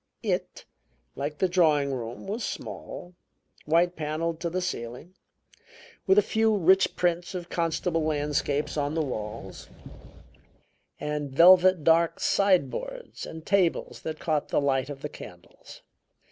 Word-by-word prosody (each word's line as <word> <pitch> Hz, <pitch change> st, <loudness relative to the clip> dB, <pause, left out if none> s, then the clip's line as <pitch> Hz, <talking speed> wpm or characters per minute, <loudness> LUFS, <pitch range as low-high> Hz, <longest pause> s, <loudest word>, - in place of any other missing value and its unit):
It, -, -, -3 dB, 0.5 s
like 150 Hz, +1 st, -4 dB
the 190 Hz, -, +2 dB
drawing 155 Hz, -6 st, +2 dB
room, 120 Hz, -2 st, -6 dB
was 215 Hz, +4 st, -4 dB
small, 175 Hz, 0 st, -7 dB, 0.5 s
white 170 Hz, +3 st, +2 dB
paneled 160 Hz, +2 st, -3 dB
to 170 Hz, -, -2 dB
the 180 Hz, +2 st, -2 dB
ceiling, 125 Hz, -1 st, -5 dB, 0.9 s
with 190 Hz, +1 st, +5 dB
a 210 Hz, -, +7 dB
few 220 Hz, 0 st, +2 dB
rich 190 Hz, +1 st, +4 dB
prints 175 Hz, +1 st, -1 dB
of 175 Hz, -1 st, -6 dB
Constable 165 Hz, 0 st, 0 dB
landscapes 150 Hz, -1 st, -1 dB
on 145 Hz, +1 st, -1 dB
the 160 Hz, -, +1 dB
walls, 105 Hz, -5 st, -6 dB, 1.3 s
and 150 Hz, -1 st, -3 dB
velvet 180 Hz, +3 st, +6 dB
dark 165 Hz, +1 st, +3 dB
sideboards 200 Hz, -, 0 dB
and 160 Hz, 0 st, -9 dB
tables 190 Hz, -4 st, +1 dB
that 155 Hz, -1 st, -5 dB
caught 155 Hz, -2 st, -1 dB
the -, -, +2 dB
light 135 Hz, -1 st, 0 dB
of 140 Hz, -1 st, -8 dB
the -, -, -1 dB
candles. 90 Hz, -9 st, -13 dB
160 Hz, 130 wpm, -27 LUFS, 145-180 Hz, 1.3 s, a